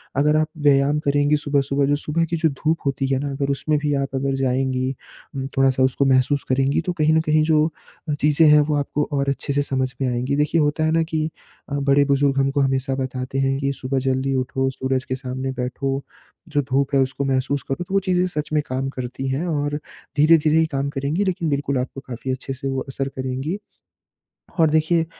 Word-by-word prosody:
अगर 150 +3 +3
आप 155 0 +2
व्यायाम 145 0 +3
करेंगी 145 +1 +3
सुबह-सुबह, 140 -1 +1
जो 145 +1 +2
सुबह 155 +3 -1
की 170 - +1
जो 160 0 +2
धूप 155 +4 -1
होती 135 0 0
है 135 -1 +1
ना 145 0 -3
अगर 140 0 -2
उसमे 150 +2 0
भी 145 0 -1
आप 140 -1 -1
अगर 135 0 0
जाएँगी, 130 0 0 0.4
उम, 135 0 -3
थोड़ा-सा 130 -1 +3
उसको 130 +1 +2
महसूस 135 +2 +3
करेंगी 135 +4 +2
तो 180 - -2
कहीं 155 0 +3
न 160 - +4
कहीं 155 -1 +2
जो 155 0 +3 0.5
चीज़े 150 +2 +4
है 150 0 +7
वो 150 0 0
आपको 145 +1 -1
और 140 -1 0
अच्छे 140 +1 -2
से 145 - +2
समझ 130 -2 -1
में 130 - +1
आएँगी। 125 +3 -1
देखिए 150 +2 +2
होता 150 +2 +1
है 155 - +2
ना 165 0 +3
कि 160 -1 -2 0.4
अ, - - -5
बड़े 140 +1 +3
बुजुर्ग 140 0 +2
हमको 135 +1 +1
हमेशा 135 0 0
बताते 130 0 -3
हैं 135 0 +1
कि 140 0 0
सुबह 130 0 -2
जल्दी 130 +1 0
उठो, 135 +1 0
सूरज 130 0 -2
के 130 - -2
सामने 130 0 -4
बैठो, 135 +2 -2 0.5
जो 145 -1 +1
धूप 140 +1 +1
है - - +5
उसको 135 +1 -1
महसूस 135 0 0
करो 135 +6 -2
तो 195 - -6
वो 195 - +4
चीज़े 180 -1 +1
सच 150 -4 -4
में 150 - +3
काम 130 +1 -2
करती 130 0 -5
हैं। 140 +7 -1
और 145 -2 -1 0.4
धीरे-धीरे 155 0 +5
ही 160 - +4
काम 140 0 -1
करेंगी 145 +7 -1
लेकिन 175 -4 -1
बिल्कुल 140 -1 -1
आपको 130 +2 -4
काफ़ी 130 +1 -4
अच्छे 130 +1 -4
से 135 +1 -5
वो 135 0 -1
असर 135 0 -3
करेंगी। 130 +7 -3 1.0
और 160 -1 +5
देखिए 160 +2 +2
140 Hz, 210 wpm, -22 LUFS, 135-150 Hz, 1.0 s, है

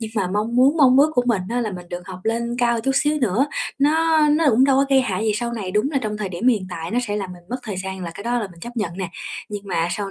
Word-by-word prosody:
nhưng 220 -1 -5
mà 200 -4 +1
mong 220 +4 -1
muốn 270 +5 +5
mong 265 -4 +6
ước 300 +2 +5
của 245 - +3
mình 220 -6 +1
á 245 +1 -1
là 220 -3 -2
mình 180 -1 -9
được 175 0 -7
học 185 -1 -8
lên 235 +1 -1
cao 235 -1 +2
chút 270 - 0
xíu 295 +2 +2
nữa, 245 +2 +2 0.3
nó 320 +3 +3
nó 310 +2 +3
cũng 250 +3 +4
đâu 270 -1 +4
có 275 - +4
gây 270 -1 +6
hại 215 -4 -2
gì 215 - +2
sau 235 +2 -2
này. 200 -5 -4
Đúng 210 +8 +1
là 280 - +1
trong 210 -1 -2
thời 210 -3 -3
điểm 185 +7 0
hiện 210 -7 +1
tại 165 -1 -5
nó 240 - 0
sẽ 205 -1 -2
làm 195 -3 -4
mình 175 -1 -13
mất 250 - -1
thời 210 -5 -5
gian 190 0 -5
là 170 - -4
cái 200 - -9
đó 240 +1 0
là 215 - -2
mình 170 -1 -16
chấp 240 +4 -8
nhận 180 -6 -2
nè, 185 -3 -3 0.4
nhưng 205 -1 -5
mà 170 -2 0
sau 200 -2 -3
225 Hz, 315 wpm, -22 LUFS, 190-255 Hz, 0.4 s, mong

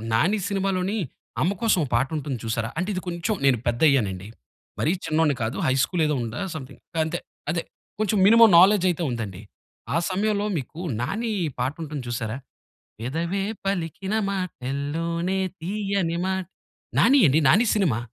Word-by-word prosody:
"నాని" 195 - +2
సినిమాలోని 195 +1 0 0.4
అమ్మ 180 - +2
కోసం 220 -6 +3
ఒక - - -3
పాట 130 +3 +2
ఉంటుంది 140 -3 -3
చూశారా? 115 0 -1
అంటే 185 +3 -1
ఇది 185 - -3
కొంచెం 175 +5 -1
నేను 130 -3 +5
పెద్దయ్యానండి. 120 - +2 0.5
మరీ 155 - +2
చిన్నోడిని 155 -2 +2
కాదు. 110 - -2
హై 130 - +3
స్కూల్ 175 -3 -1
ఏదో 150 - +1
ఉందా! 115 +1 -5 0.2
సమ్‌థింగ్ 130 -4 -9 0.2
గంతే. 160 +2 0 0.3
అదే. 170 -1 -1 0.4
కొంచెం 215 -1 +1
మినిమమ్ 225 0 +8
నాలెడ్జ్ 190 0 +6
అయితే 175 0 -1
ఉందండి. 110 -5 -4 0.5
ఆ - - +4
సమయంలో 205 +2 0
మీకు 150 +5 -7 0.2
నాని 220 - -2 0.3
పాటుంటుంది 145 +2 -3
చూశారా? 115 0 -3 0.6
పెదవే 165 +10 -2 0.2
పలికిన 190 +1 -2 0.2
మాటల్లోనే 170 +1 -2 0.2
తియ్యని 195 -2 -1
మాట్ 190 -2 -2 0.5
'నాని' 275 0 +6
అండి. 140 +4 +4
'నాని' 215 - +5
సినిమా. 165 - +2
165 Hz, 140 wpm, -24 LUFS, 135-195 Hz, 0.6 s, మినిమమ్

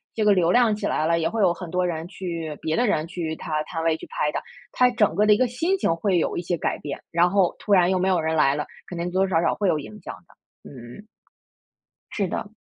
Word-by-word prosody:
这 220 - 0
个 210 - +6
流 175 -2 +2
量 235 -2 +4
起 210 0 -5
来 155 - 0
了， 170 0 +2
也 165 - +1
会 225 - -2
有 185 -3 +4
很 175 -1 -8
多 180 0 +1
人 165 -1 -4
去 165 -5 -5
别 160 0 -1
的 245 - +2
人 155 -4 0
去 165 -2 -4
她 155 -1 -3
摊 165 +1 -5
位 165 -1 +1
去 - - -10
拍 - - -1
她， - - -3 0.3
她 250 0 +3
整 210 -8 +2
个 210 - +3
的 210 - +6
一 - - +2
个 255 - +2
心 325 +11 0
情 165 - +1
会 180 +1 +1
有 - - -1
一 - - -1
些 175 0 -1
改 - - -2
变， 145 -1 -6
然 170 +1 +3
后 195 -3 +2
突 205 - 0
然 180 -1 +5
又 190 - +2
没 185 +1 0
有 180 -3 +2
人 160 0 -1
来 140 -3 +4
了， 150 - -3 0.2
肯 180 - -7
定 170 +1 -2
多 190 +1 +2
多 - - -3
少 165 -3 +1
少 170 - +1
会 205 - 0
有 155 - +1
影 210 +8 -10
响 - - -6
的， - - -20
嗯。 125 - -12 1.1
是 200 -3 0
的。 205 - -4
180 Hz, 295 characters per minute, -24 LUFS, 160-205 Hz, 1.1 s, 个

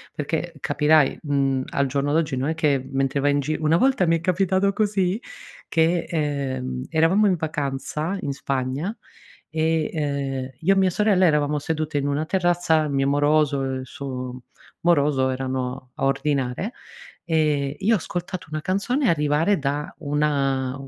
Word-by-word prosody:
perché 160 +3 -3
capirai, 150 0 +3
mhmm, 135 -3 0
al 140 - 0
giorno 140 +2 -1
d'oggi, 155 -4 +1
non 130 +2 -1
è 160 - -1
che 150 -4 +2
mentre 135 +1 0
vai 145 +1 +2
in 145 - +2
gi 155 +3 -2
una 155 +1 +2
volta 260 -4 +3
mi 165 - +4
è - - -9
capitato 190 +2 +2
così 200 -1 0 0.5
che, 165 +1 +2
ehm, 130 -5 -2
eravamo 165 +6 +3
in 190 - +3
vacanza 155 +3 -3
in 140 - -2
Spagna 135 - -2 0.5
e, 160 0 0
ehm, 140 -3 -2
io 190 +4 +4
e - - 0
mia 190 -1 +4
sorella 195 0 +3
eravamo 150 -2 +2
sedute 155 0 -2
in 140 0 0
una 145 +2 0
terrazza, 175 -3 +2
il 150 - -3
mio 135 0 +1
moroso 145 -1 +2
e 135 0 -2
il 130 - -7
suo 130 -1 -6 0.4
moroso, 145 -5 +3
erano 130 0 -3
a - - -1
ordinare, 135 - -1 0.5
e 150 -4 +1
io 205 +4 +2
ho - - +2
ascoltato 175 0 -5
una 155 0 -3
canzone 230 - 0
arrivare 155 +4 +2
da 145 +1 -2
una 140 -3 0
150 Hz, 160 wpm, -23 LUFS, 135-170 Hz, 0.5 s, mi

